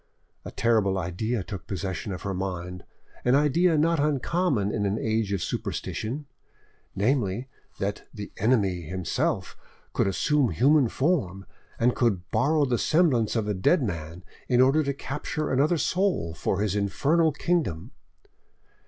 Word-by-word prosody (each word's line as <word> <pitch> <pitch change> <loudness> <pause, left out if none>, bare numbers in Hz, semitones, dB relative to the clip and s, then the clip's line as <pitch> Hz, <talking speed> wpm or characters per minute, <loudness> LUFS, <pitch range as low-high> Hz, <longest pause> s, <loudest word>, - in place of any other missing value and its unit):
A - - -7
terrible 110 -4 +1
idea 95 +5 -2
took 95 -1 -8
possession 95 0 -4
of 95 - -6
her 100 - -2
mind, 90 -1 -5 0.4
an 125 +1 +4
idea 155 +4 +3
not 165 +1 +2
uncommon 145 - +1
in 105 -2 0
an 100 +2 -1
age 110 -2 -1
of 95 -4 -1
superstition, 135 +7 -4 0.7
namely, 120 +1 0 0.3
that 100 0 -3
the 105 -2 -8
Enemy 100 -6 +2
himself 90 +2 -2 0.4
could - - +1
assume 135 +7 +2
human 135 - +4
form, 110 - 0 0.3
and 120 +1 +2
could 100 -7 0
borrow 145 +7 +2
the 125 -3 0
semblance 145 - +2
of 110 -2 0
a 105 - 0
dead 130 - +2
man 85 -4 -5 0.2
in 125 -1 +2
order 135 +4 +5
to 140 -2 -1
capture 150 +3 -4
another 145 +6 +2
soul 180 - 0
for 95 +4 -1
his 105 -2 0
infernal 145 - +2
kingdom. 150 - -1
115 Hz, 145 wpm, -26 LUFS, 95-145 Hz, 0.7 s, order